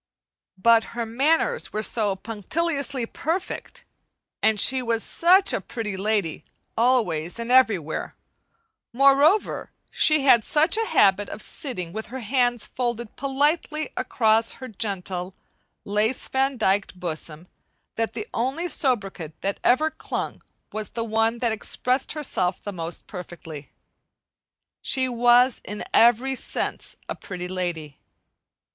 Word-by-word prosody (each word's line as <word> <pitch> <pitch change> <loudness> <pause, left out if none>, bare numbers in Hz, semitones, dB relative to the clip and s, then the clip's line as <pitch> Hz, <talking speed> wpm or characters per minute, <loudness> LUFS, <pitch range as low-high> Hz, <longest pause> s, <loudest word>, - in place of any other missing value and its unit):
But 230 +3 +5
her 235 - -1
manners 305 - +1
were 215 - -2
so 210 -3 +1
punctiliously 270 - -1
perfect, 330 +10 -4 0.6
and 220 -1 +3
she 260 +6 +3
was 230 -2 -1
such 370 +3 +4
a - - -1
"pretty 220 -5 -5
lady" 200 -4 -1 0.3
always 220 -9 +1
and 235 +1 -4
everywhere; 215 - +2 0.8
moreover 275 - +4 0.2
she 305 -2 +3
had 240 -5 +6
such 310 - +3
a 450 0 0
habit 200 +1 +3
of - - -7
sitting 190 - -5
with 220 +1 -5
her 260 +1 -7
hands 245 0 +1
folded 235 -3 -3
politely 295 +3 0
across 225 -1 +2
her 260 - -9
gentle, 190 -4 -4 0.5
lace 210 +5 0
vandyked 255 -9 0
bosom 165 -1 -5 0.5
that 225 0 -1
the 220 -3 -5
only 270 +9 -1
sobriquet 200 - -1
that 195 0 -2
ever 310 +6 +3
clung 315 - -5 0.3
was 215 0 -4
the 230 -1 -4
one 225 +1 +1
that 235 -1 0
expressed 250 +4 0
herself 195 - -1
the 205 - -5
most 170 -1 -5
perfectly. 170 -5 -9 1.1
She 260 -2 +1
was 245 +1 +4
in 210 0 -6
every 240 +3 +5
sense 265 - -4
a - - -3
"Pretty 180 -2 -7
Lady." 175 -6 -4
230 Hz, 125 wpm, -24 LUFS, 195-265 Hz, 1.1 s, had